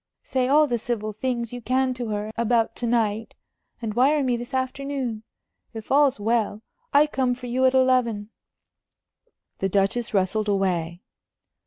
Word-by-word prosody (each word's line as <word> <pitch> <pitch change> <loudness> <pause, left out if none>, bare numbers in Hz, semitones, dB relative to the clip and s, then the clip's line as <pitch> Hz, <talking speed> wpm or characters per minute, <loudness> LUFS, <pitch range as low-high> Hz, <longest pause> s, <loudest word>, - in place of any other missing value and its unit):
Say 255 -2 0
all 300 +3 +5
the 240 -4 -1
civil 215 -2 -3
things 235 +1 -3
you 245 - -6
can 255 +2 +1
to 245 -2 -4
her 210 0 -3
about 230 0 +1
to 240 - -2
night, 225 -2 0 0.5
and 215 -2 -2
wire 275 +5 +3
me 250 -2 +1
this 240 +2 -6
afternoon. 260 -3 -3 0.5
If 220 -1 -8
all's 280 -4 +4
well, 220 0 0 0.3
I 290 +1 +6
come 260 -4 0
for 250 0 -10
you 250 +2 +1
at 260 0 +3
eleven." 245 -5 +2 1.3
The 195 - 0
Duchess 200 +5 0
rustled 210 +2 +1
away. 180 -3 -1
240 Hz, 155 wpm, -24 LUFS, 215-260 Hz, 1.3 s, I